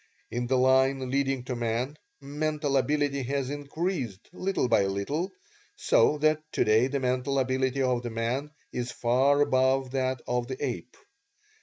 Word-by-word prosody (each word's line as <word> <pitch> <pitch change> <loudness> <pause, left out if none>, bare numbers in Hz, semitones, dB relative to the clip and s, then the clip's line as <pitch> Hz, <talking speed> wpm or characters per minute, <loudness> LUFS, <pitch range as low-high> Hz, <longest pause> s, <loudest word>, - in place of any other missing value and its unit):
In 120 +1 -2
the 130 +1 +2
line 130 0 +3
leading 135 -2 0
to 125 0 -4
man, 120 +4 -2 0.2
mental 150 0 -2
ability 140 +1 +1
has 135 +1 -2
increased 145 - -4
little 190 -7 -1
by 115 -4 +3
little 140 - -2 0.4
so 410 - +3
that 155 +1 +2
today 110 +4 +3
the 140 +1 -2
mental 130 +1 0
ability 130 0 +1
of 125 -2 +1
the 120 - -4
man 120 +6 -2 0.2
is 125 0 -3
far 130 +4 +2
above 130 -1 +2
that 130 -1 -1
of 125 0 -1
the 130 - -5
ape. 125 -1 -5
130 Hz, 150 wpm, -28 LUFS, 125-140 Hz, 0.4 s, line